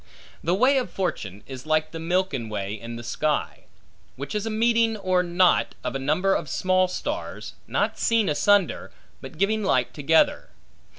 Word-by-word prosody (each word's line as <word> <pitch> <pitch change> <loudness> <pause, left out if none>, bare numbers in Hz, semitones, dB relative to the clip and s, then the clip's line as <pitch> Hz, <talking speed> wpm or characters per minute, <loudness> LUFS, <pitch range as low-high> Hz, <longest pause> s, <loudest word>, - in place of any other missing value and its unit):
The 175 +3 +1
way 260 +6 +4
of 250 - -4
fortune, 110 - -4
is 130 +1 -9
like 155 0 +1
the 165 - -6
Milken 165 -8 -1
Way 100 -1 -3
in 115 +2 -7
the 120 - -8
sky; 150 +5 -2 0.5
which 140 +2 -6
is 210 +1 -2
a - - -1
meeting 225 0 +2
or 185 -2 +1
knot 175 +1 +2
of - - -3
a 135 - -2
number 155 +8 +1
of 150 - -2
small 185 +4 +2
stars; 290 - -5
not - - -1
seen 225 -3 +2
asunder, 200 +5 +2 0.3
but - - -10
giving 215 +2 +1
light 130 -10 +1
together. 160 - +2
180 Hz, 170 wpm, -24 LUFS, 140-210 Hz, 0.5 s, way